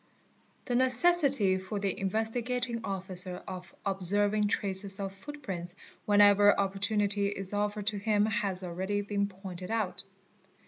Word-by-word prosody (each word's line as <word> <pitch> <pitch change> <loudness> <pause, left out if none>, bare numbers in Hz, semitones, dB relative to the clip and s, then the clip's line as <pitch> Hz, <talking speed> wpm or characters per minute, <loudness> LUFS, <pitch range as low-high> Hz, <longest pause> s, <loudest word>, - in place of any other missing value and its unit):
The 250 - -3
necessity 260 - +4
for 190 +3 -6
the 200 -1 -1
Investigating 230 +4 -2
Officer 185 -2 -4
of 185 -1 -9
observing 205 +2 +2
traces 195 -1 +1
of 195 -1 -5
foo: 245 +10 -10
prints 180 -11 -7 0.3
whenever 205 0 +5
opportunity 200 +1 0
is 195 -1 -5
offered 205 0 -2
to 205 - -4
him 210 0 +1
has 195 -4 -2
already 190 +4 -3
been 200 0 -2
pointed 185 -2 -9
out. 220 -5 -2
200 Hz, 130 wpm, -29 LUFS, 190-215 Hz, 0.3 s, whenever